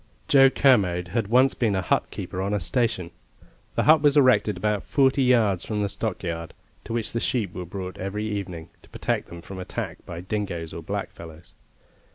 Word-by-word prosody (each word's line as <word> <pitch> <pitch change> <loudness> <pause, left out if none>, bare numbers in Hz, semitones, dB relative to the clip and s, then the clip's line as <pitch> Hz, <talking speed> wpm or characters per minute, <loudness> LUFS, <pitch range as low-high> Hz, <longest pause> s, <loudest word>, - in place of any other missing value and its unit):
Joe 135 -1 +7
Kermode 95 -11 +3
had 115 -1 -1
once 130 +4 +4
been 110 -5 0
a 95 - -1
hutkeeper 90 +1 -2
on 100 +2 -1
a - - 0
station. 95 -2 -1 0.6
The - - +2
hut 155 0 +6
was 145 -1 +4
erected 130 -7 +4
about 105 +1 0
forty 135 0 +2
yards 115 -8 +3
from 105 -1 -2
the 100 - -1
stockyard, 85 -6 -4 0.3
to - - -5
which 115 -2 -2
the 115 - 0
sheep 110 -7 -1
were 90 -1 -6
brought 95 0 -6
every 100 +3 -3
evening, 95 -6 -5
to - - -21
protect - - -2
them 85 0 -10
from 95 -1 -8
attack 90 - -5
by 85 0 -6
dingoes 90 -4 -4
or 85 - -6
blackfellows. 80 0 -7
100 Hz, 185 wpm, -25 LUFS, 90-120 Hz, 0.6 s, Joe